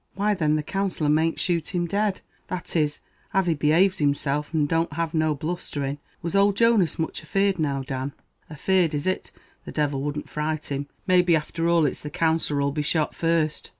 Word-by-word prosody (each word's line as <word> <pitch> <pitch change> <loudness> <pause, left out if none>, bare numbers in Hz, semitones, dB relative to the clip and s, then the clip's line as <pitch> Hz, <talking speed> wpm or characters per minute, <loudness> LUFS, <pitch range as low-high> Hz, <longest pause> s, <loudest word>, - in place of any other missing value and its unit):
"Why 205 +2 +2
thin, 155 -6 +1
the 155 - -1
Counsellor 190 -3 -1
mayn't 160 +2 +2
shoot 175 0 -1
him 175 -1 +1
dead; 200 +2 0 0.3
that 180 -1 -5
is, 150 -2 +1 0.3
av 195 -1 +3
he 170 - +2
behaves 160 +6 +3
himself, 145 0 0
and 155 -3 +1
don't 165 0 0
have 165 0 -2
no 155 -1 +2
blusthering. 145 -3 -3 0.2
Was 170 +3 -2
old 200 0 +4
Jonas 230 -9 +3
much 160 - -3
afeard, 195 -2 +1
now, 140 -3 0
Dan?" 135 0 -4 0.4
"Afeard, 165 +1 +1
is 145 - -2
it! 185 0 -1 0.3
the - - -8
divil 145 -3 0
wouldn't 145 +1 -3
fright 150 0 -3
him. 140 +1 -2 0.2
Maybe, 180 -2 +4
after 165 +2 -1
all, 170 -2 +4
it's 140 - -2
the 150 - -6
Counsellor 160 -2 +1
'll 140 - +1
be 150 +1 -2
shot 150 +1 0
first." 165 -2 0
160 Hz, 190 wpm, -25 LUFS, 150-180 Hz, 0.4 s, old